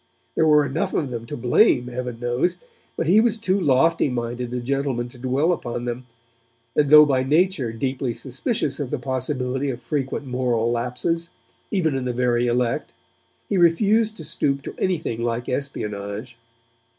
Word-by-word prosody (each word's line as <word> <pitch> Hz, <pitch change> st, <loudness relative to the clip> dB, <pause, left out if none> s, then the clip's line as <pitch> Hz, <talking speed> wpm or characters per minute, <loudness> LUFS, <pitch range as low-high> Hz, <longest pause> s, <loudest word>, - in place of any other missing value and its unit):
There 160 Hz, -, +2 dB
were 150 Hz, -1 st, +5 dB
enough 140 Hz, +4 st, -2 dB
of 140 Hz, -5 st, -1 dB
them 115 Hz, -1 st, -5 dB
to -, -, -5 dB
blame, 125 Hz, +1 st, +3 dB
Heaven 125 Hz, -1 st, -5 dB
knows, 120 Hz, +8 st, 0 dB, 0.4 s
but -, -, -1 dB
he 195 Hz, +7 st, +5 dB
was 230 Hz, -1 st, +1 dB
too 200 Hz, -3 st, 0 dB
lofty 145 Hz, +1 st, +3 dB
minded 120 Hz, 0 st, -3 dB
a 125 Hz, -, -2 dB
gentleman 130 Hz, -1 st, -1 dB
to 120 Hz, -, -14 dB
dwell 135 Hz, +7 st, +1 dB
upon 120 Hz, -6 st, -4 dB
them, 120 Hz, +1 st, -5 dB, 0.7 s
and, 145 Hz, -2 st, +3 dB
though 150 Hz, +1 st, +9 dB
by 135 Hz, -3 st, +2 dB
nature 150 Hz, -2 st, +1 dB
deeply 130 Hz, +1 st, -2 dB
suspicious 140 Hz, -, -2 dB
of 140 Hz, -4 st, -3 dB
the 150 Hz, -, -2 dB
possibility 130 Hz, +1 st, -2 dB
of 125 Hz, -2 st, -4 dB
frequent 140 Hz, 0 st, -3 dB
moral 125 Hz, -3 st, 0 dB
lapses, 125 Hz, +8 st, -1 dB, 0.4 s
even 160 Hz, -8 st, +1 dB
in 130 Hz, -1 st, -2 dB
the 125 Hz, -, -1 dB
very 120 Hz, 0 st, +1 dB
elect, 120 Hz, -1 st, -1 dB, 0.5 s
he 195 Hz, -, 0 dB
refused 210 Hz, +6 st, +3 dB
to 160 Hz, -, -8 dB
stoop 140 Hz, -2 st, -1 dB
to -, -, -6 dB
anything 165 Hz, -11 st, -1 dB
like 120 Hz, +1 st, -2 dB
espionage. 105 Hz, -4 st, -4 dB
130 Hz, 165 wpm, -23 LUFS, 120-150 Hz, 0.7 s, though